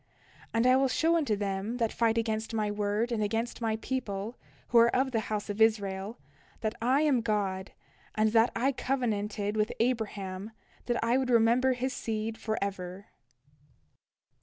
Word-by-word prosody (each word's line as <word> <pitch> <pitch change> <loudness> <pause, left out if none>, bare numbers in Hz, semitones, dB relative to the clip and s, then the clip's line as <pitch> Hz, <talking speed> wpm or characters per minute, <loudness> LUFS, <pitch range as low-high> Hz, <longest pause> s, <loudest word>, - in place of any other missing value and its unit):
And 230 +1 +1
I 255 0 +6
will 270 0 +3
show 325 +5 +2
unto 290 -10 +1
them 200 +3 -2
that 230 -2 0
fight 230 -1 +2
against 225 0 -1
my 210 -1 0
word 210 +3 -1
and 225 -2 0
against 225 +4 -2
my 225 -1 0
people, 220 -2 -4 0.3
who 235 - +6
are 230 - +7
of 265 +1 +2
the 230 - +1
house 210 -1 -2
of 205 +1 -4
Israel, 205 0 +1 0.4
that 220 -1 -1
I 260 +5 +3
am 285 -6 +3
God, 200 -3 -1 0.4
and 215 0 +2
that 225 +1 +4
I 260 +4 +2
covenanted 215 -6 -1
with 215 0 +1
Abraham 210 -4 -2 0.3
that 240 -1 +1
I 235 +2 +3
would 260 -1 -1
remember 240 +2 +4
his 255 +1 -2
seed 220 0 -3
forever. 200 -3 -4
225 Hz, 160 wpm, -29 LUFS, 205-240 Hz, 0.4 s, are